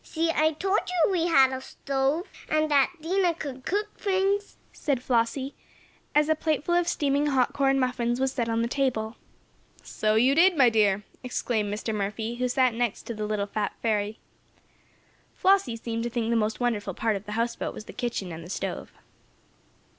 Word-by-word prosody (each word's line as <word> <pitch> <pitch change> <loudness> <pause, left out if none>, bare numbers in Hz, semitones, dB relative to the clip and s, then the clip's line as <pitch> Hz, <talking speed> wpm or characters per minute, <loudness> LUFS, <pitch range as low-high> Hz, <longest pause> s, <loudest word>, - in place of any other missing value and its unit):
"See! 330 0 -1
I 315 0 +2
told 385 +6 +1
you 360 +1 +2
we 345 -2 +1
had 270 -5 +5
a 260 - -4
stove, 275 +6 -1 0.2
and 310 0 +1
that 280 -2 +4
Dinah 355 0 +1
could 270 -5 -7
cook 415 +3 0
things," 395 +1 0 0.2
said 280 -5 -1
Flossie, 255 +3 0 0.6
as 300 0 +4
a 315 - +4
plate 310 -2 -1
full 345 - 0
of 350 0 +2
steaming 285 -2 +1
hot 265 -4 +2
corn 270 -1 +2
muffins 245 -1 0
was 265 0 +1
set 240 -3 -2
on 230 0 +1
the - - 0
table. 240 -4 -1 0.7
"So 215 0 0
you 250 +5 +4
did, 345 +3 +5
my 250 -4 +6
dear!" 205 -2 +2 0.2
exclaimed 225 -4 -1
Mr. 215 +2 -3
Murphy, 215 +3 -3
who 250 0 0
sat 255 -1 +2
next 235 -2 -1
to 235 - -5
the 215 -1 -4
little 210 -1 -1
"fat 205 0 -2
fairy." 215 -1 0 1.2
Flossie 380 -11 +3
seemed 230 0 -4
to 240 - -2
think 235 -1 -1
the - - +2
most 220 -1 0
wonderful 210 -6 -1
part 225 -1 0
of 200 +1 -7
the 210 - -4
houseboat 230 +2 -2
was 215 - -8
the - - -10
kitchen 235 -7 -3
and 160 0 -7
the 170 - -11
stove. - - -4
250 Hz, 190 wpm, -26 LUFS, 225-305 Hz, 1.2 s, my